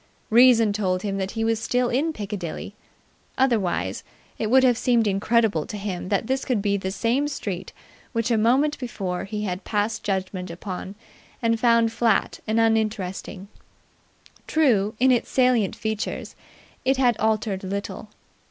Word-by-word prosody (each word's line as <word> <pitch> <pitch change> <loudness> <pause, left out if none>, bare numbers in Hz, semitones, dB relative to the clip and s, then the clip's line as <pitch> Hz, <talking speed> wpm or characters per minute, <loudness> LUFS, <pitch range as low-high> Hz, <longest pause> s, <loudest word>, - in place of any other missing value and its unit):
Reason 230 -2 +6
told 185 -3 -1
him 200 -2 -2
that 190 0 -2
he 225 - 0
was 225 -1 +1
still 250 +1 +1
in 295 +6 +1
Piccadilly. 200 - -6 0.6
Otherwise 235 -9 0 0.4
it 215 - -1
would 260 +2 +5
have 250 -2 +5
seemed 240 -1 +2
incredible 205 -3 +1
to 210 - -6
him 190 -3 -4
that 200 +1 0
this 265 +3 -1
could 250 -5 0
be 200 0 +1
the 190 -1 -2
same 240 +8 0
street 200 -11 -5 0.4
which 230 0 -1
a - - +4
moment 270 +7 +2
before 195 -8 -4
he 210 +2 -4
had 185 -1 -3
passed 215 +1 -1
judgment 190 -2 -3
upon 185 +2 -6 0.4
and 230 -1 +1
found 230 -1 +4
flat 225 -2 +1
and 220 +1 +1
uninteresting. 215 -4 -1 1.0
True, 225 -10 +2
in 260 +1 +5
its 245 - +1
salient 250 -6 +2
features 220 -1 -4 0.5
it 265 +1 +2
had 245 -3 +3
altered 215 -3 0
little. 200 +3 -5
220 Hz, 150 wpm, -24 LUFS, 195-240 Hz, 1.0 s, Reason